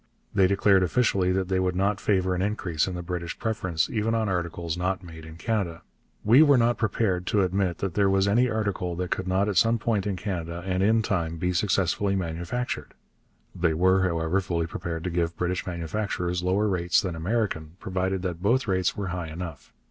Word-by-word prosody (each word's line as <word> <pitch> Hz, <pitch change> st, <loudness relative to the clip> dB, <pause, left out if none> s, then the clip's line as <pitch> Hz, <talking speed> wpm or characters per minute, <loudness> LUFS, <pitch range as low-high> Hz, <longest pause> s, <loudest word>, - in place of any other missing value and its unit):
They 95 Hz, -2 st, +4 dB
declared 100 Hz, 0 st, +4 dB
officially 95 Hz, -1 st, +2 dB
that 95 Hz, -1 st, 0 dB
they 95 Hz, 0 st, +1 dB
would 90 Hz, -1 st, 0 dB
not 100 Hz, +2 st, 0 dB
favour 95 Hz, -2 st, +1 dB
an 90 Hz, -, -1 dB
increase 95 Hz, -6 st, -1 dB
in 95 Hz, -, -4 dB
the 90 Hz, -, -5 dB
British 85 Hz, -1 st, -4 dB
preference 95 Hz, -8 st, -1 dB
even 115 Hz, 0 st, 0 dB
on 110 Hz, -1 st, 0 dB
articles 85 Hz, -2 st, -2 dB
not 90 Hz, +1 st, -2 dB
made 80 Hz, -2 st, -10 dB
in 80 Hz, 0 st, -10 dB
Canada: 90 Hz, -4 st, -2 dB, 0.4 s
'we 120 Hz, +7 st, +6 dB
were 145 Hz, -4 st, +6 dB
not 120 Hz, 0 st, +2 dB
prepared 100 Hz, -4 st, 0 dB
to 100 Hz, -2 st, +2 dB
admit 95 Hz, -2 st, 0 dB
that 95 Hz, -3 st, -3 dB
there 100 Hz, +1 st, +3 dB
was 95 Hz, 0 st, +3 dB
any 120 Hz, +5 st, +3 dB
article 100 Hz, -6 st, -2 dB
that 90 Hz, +1 st, -4 dB
could 95 Hz, -, -2 dB
not 95 Hz, +2 st, +2 dB
at 100 Hz, -4 st, -1 dB
some 115 Hz, +5 st, +4 dB
point 105 Hz, -3 st, -1 dB
in 100 Hz, -, -1 dB
Canada, 85 Hz, -3 st, -4 dB
and 95 Hz, -1 st, 0 dB
in 110 Hz, +3 st, +3 dB
time, 85 Hz, -5 st, -1 dB
be 90 Hz, +2 st, -1 dB
successfully 100 Hz, +1 st, +1 dB
manufactured.' 90 Hz, +7 st, -3 dB, 0.6 s
They 85 Hz, -3 st, +1 dB
were, 95 Hz, +3 st, +4 dB
however, 85 Hz, +1 st, +1 dB
fully 85 Hz, -3 st, -1 dB
prepared 80 Hz, -1 st, -5 dB
to 90 Hz, -, -2 dB
give 85 Hz, 0 st, -1 dB
British 90 Hz, +1 st, -2 dB
manufacturers 90 Hz, +1 st, -2 dB
lower 95 Hz, +4 st, +1 dB
rates 90 Hz, -3 st, +2 dB
than 90 Hz, -5 st, -3 dB
American, 85 Hz, -3 st, -2 dB
provided 95 Hz, -1 st, -2 dB
that 90 Hz, -2 st, -3 dB
both 120 Hz, +6 st, +2 dB
rates 95 Hz, -2 st, 0 dB
were 100 Hz, -2 st, -3 dB
high 90 Hz, -2 st, -4 dB
enough. 80 Hz, -2 st, -7 dB
95 Hz, 200 wpm, -26 LUFS, 85-100 Hz, 0.6 s, we